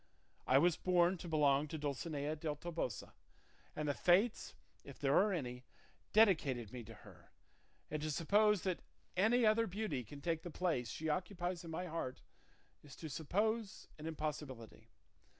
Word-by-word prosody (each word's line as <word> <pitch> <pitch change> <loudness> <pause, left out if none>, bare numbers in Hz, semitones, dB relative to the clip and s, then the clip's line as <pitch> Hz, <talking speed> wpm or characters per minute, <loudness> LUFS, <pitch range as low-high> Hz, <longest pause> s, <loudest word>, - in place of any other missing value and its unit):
I 130 - +6
was 170 +3 +4
born 180 0 +3
to 175 - -7
belong 150 -2 +3
to 160 - -5
Dulcinea 145 +1 -2
del 155 -1 -3
Toboso, 160 -8 -4 0.6
and 150 0 -2
the 145 - +2
fates, 195 - +2 0.3
if 140 - -11
there 140 0 +2
are 205 +2 +5
any, 125 -8 -3 0.5
dedicated 150 - +3
me 125 -2 -6
to - - -11
her; - - -15 0.6
and 155 0 -2
to 155 - -2
suppose 205 +6 +3
that 185 -3 -1 0.3
any 225 +6 +4
other 220 +1 +4
beauty 180 - -2
can 140 +6 -10
take 165 +2 -1
the 175 - -7
place 160 -9 -1
she 160 - -4
occupies 175 +2 -2
in 165 - -8
my 165 +3 -3
heart 160 -7 -4 0.6
is 145 -2 -13
to 160 -3 -7
suppose 205 - -1
an 155 - -6
impossibility. 150 -7 -5
160 Hz, 160 wpm, -37 LUFS, 145-185 Hz, 0.6 s, I